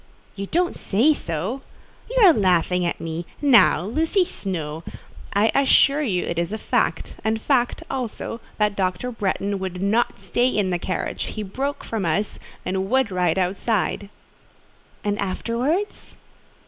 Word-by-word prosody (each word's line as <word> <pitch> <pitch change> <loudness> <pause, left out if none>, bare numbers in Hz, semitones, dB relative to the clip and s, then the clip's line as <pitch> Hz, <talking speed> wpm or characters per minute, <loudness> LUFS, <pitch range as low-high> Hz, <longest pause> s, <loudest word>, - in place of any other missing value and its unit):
"You 195 0 -5
don't 350 - +1
say 240 +11 +3
so? 185 - -3 0.5
You - - +3
are 350 - +8
laughing 180 - +2
at - - -3
me. 165 +1 -5
Now, 235 - +5
Lucy 320 - +1
Snowe—" 165 - -5 0.5
"I 210 +2 +4
assure 275 +1 +4
you 195 -11 0
it 170 - -2
is 170 +2 -1
fact—and 220 0 -1
fact, 245 0 +1
also, 240 -2 -4 0.2
that 210 -1 +1
Dr. 190 +5 -1
Bretton 200 -2 -1
would 185 -1 -4
not 215 +5 +1
stay 245 +1 +1
in 205 -7 +1
the 175 - 0
carriage: 185 - -3
he 215 - -5
broke 270 +9 -3
from 225 -3 -3
us, 185 +5 -1 0.3
and 190 +1 -1
would 260 -3 +2
ride 180 -1 +1
outside." 195 +1 0 0.9
"And 205 0 -1
afterwards?" 245 - -2
205 Hz, 140 wpm, -23 LUFS, 185-250 Hz, 0.9 s, are